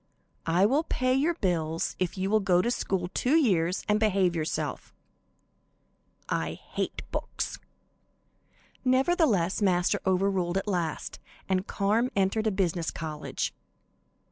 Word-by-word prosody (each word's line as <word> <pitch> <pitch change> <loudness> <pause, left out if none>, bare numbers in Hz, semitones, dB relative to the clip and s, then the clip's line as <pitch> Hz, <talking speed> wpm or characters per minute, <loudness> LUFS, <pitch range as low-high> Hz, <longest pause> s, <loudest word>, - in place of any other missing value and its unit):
"I 175 +4 +4
will 270 +8 +3
pay 255 -5 0
your 300 +6 +2
bills 165 - -1
if 185 +1 -1
you 190 +1 -1
will 215 - +5
go 180 -3 +3
to 240 - +1
school 185 -6 -1
two 260 +5 +2
years 185 - +2
and 210 0 +3
behave 195 -5 +2
yourself." 155 -1 -3 1.3
"I - - -1
hate - - -5
books!" - - -3 1.2
Nevertheless, 255 - +2
Master 180 -3 +2
overruled 190 -1 +1
at 195 - -2
last, 175 -5 -2 0.3
and 190 +1 0
Carm 220 +5 +1
entered 200 +3 +1
a - - +2
business 175 -4 0
college. 155 -2 -4
195 Hz, 125 wpm, -28 LUFS, 175-220 Hz, 1.3 s, will